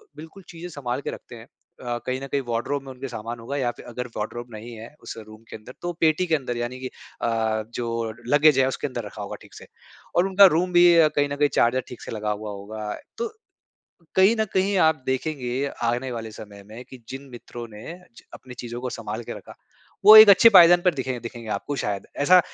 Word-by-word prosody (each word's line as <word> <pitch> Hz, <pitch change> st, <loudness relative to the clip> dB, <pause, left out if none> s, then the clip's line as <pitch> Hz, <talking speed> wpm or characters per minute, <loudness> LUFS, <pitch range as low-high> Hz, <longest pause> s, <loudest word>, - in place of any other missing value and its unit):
बिल्कुल 160 Hz, +5 st, -12 dB
चीज़ें 175 Hz, +1 st, -9 dB
सँभाल 135 Hz, -4 st, -4 dB
के -, -, -4 dB
रखते -, -, -11 dB
हैं। 115 Hz, 0 st, -12 dB
अ, 120 Hz, -1 st, -8 dB
कहीं 130 Hz, +1 st, -2 dB
न 135 Hz, -, -6 dB
कहीं 140 Hz, 0 st, -1 dB
वार्डरोब 120 Hz, +5 st, -2 dB
में 135 Hz, -, -9 dB
उनके 130 Hz, +1 st, -7 dB
सामान 115 Hz, 0 st, -7 dB
होगा 135 Hz, +5 st, -5 dB
या 120 Hz, -3 st, 0 dB
फिर -, -, -14 dB
अगर 125 Hz, +1 st, -6 dB
वार्डरोब 120 Hz, +3 st, -5 dB
नहीं 115 Hz, +2 st, -9 dB
है 115 Hz, +5 st, -11 dB
उस -, -, -7 dB
रूम 110 Hz, +1 st, -14 dB
के -, -, -8 dB
अंदर 110 Hz, +4 st, -12 dB
तो 175 Hz, 0 st, -3 dB
पेटी 160 Hz, +2 st, +3 dB
के 160 Hz, -, +2 dB
अंदर 125 Hz, -4 st, -4 dB
यानी 120 Hz, +2 st, -4 dB
की 130 Hz, -, -5 dB, 0.3 s
अ, 110 Hz, -1 st, 0 dB
जो 115 Hz, -2 st, -3 dB
लगेज 145 Hz, 0 st, +5 dB
है 130 Hz, -, +4 dB
उसके 135 Hz, -, -3 dB
अंदर 125 Hz, -3 st, -5 dB
रखा 105 Hz, 0 st, -9 dB
होगा 100 Hz, -, -6 dB
ठीक -, -, -17 dB
से। -, -, -13 dB, 0.5 s
और 175 Hz, +2 st, +3 dB
उनका 195 Hz, +1 st, +7 dB
रूम 180 Hz, +2 st, 0 dB
भी 175 Hz, 0 st, +7 dB
अ, 160 Hz, -2 st, +6 dB
कहीं 145 Hz, 0 st, +2 dB
न 140 Hz, -, -3 dB
कहीं 145 Hz, 0 st, +2 dB
चार्जर 125 Hz, +2 st, +3 dB
ठीक 125 Hz, -, -11 dB
से -, -, -8 dB
लगा 105 Hz, -1 st, -3 dB
हुआ 105 Hz, 0 st, -5 dB
होगा। 105 Hz, +1 st, -6 dB, 0.2 s
तो 470 Hz, -, -2 dB, 0.9 s
कहीं 195 Hz, +4 st, +5 dB
न 220 Hz, -, +3 dB
कहीं 195 Hz, +1 st, +1 dB
आप 160 Hz, -5 st, +3 dB
देखेंगे 130 Hz, -1 st, -2 dB, 0.2 s
आने 120 Hz, +2 st, -1 dB
वाले 115 Hz, -1 st, -6 dB
समय 100 Hz, -2 st, -11 dB
में 115 Hz, +4 st, -10 dB
कि 130 Hz, -2 st, -12 dB
जिन 135 Hz, +1 st, -8 dB
मित्रों 120 Hz, 0 st, -9 dB
ने 110 Hz, +10 st, -9 dB, 0.2 s
च -, -, -14 dB
अपनी 125 Hz, -1 st, -13 dB
चीजों 120 Hz, 0 st, -6 dB
को 125 Hz, -, -4 dB
सँभाल 110 Hz, 0 st, -6 dB
के -, -, -6 dB
रखा -, -, -14 dB, 0.5 s
वो 215 Hz, -, +11 dB
एक 215 Hz, 0 st, +11 dB
अच्छे 215 Hz, +4 st, +8 dB
पायदान 175 Hz, -3 st, +8 dB
पर 180 Hz, -4 st, +2 dB
दिखें 130 Hz, -2 st, -4 dB
दिखेंगे 115 Hz, -1 st, -8 dB
आपको 125 Hz, +8 st, -3 dB
शायद 100 Hz, -6 st, -3 dB, 0.2 s
ऐसा 180 Hz, +3 st, +7 dB
125 Hz, 230 wpm, -24 LUFS, 115-155 Hz, 0.9 s, वो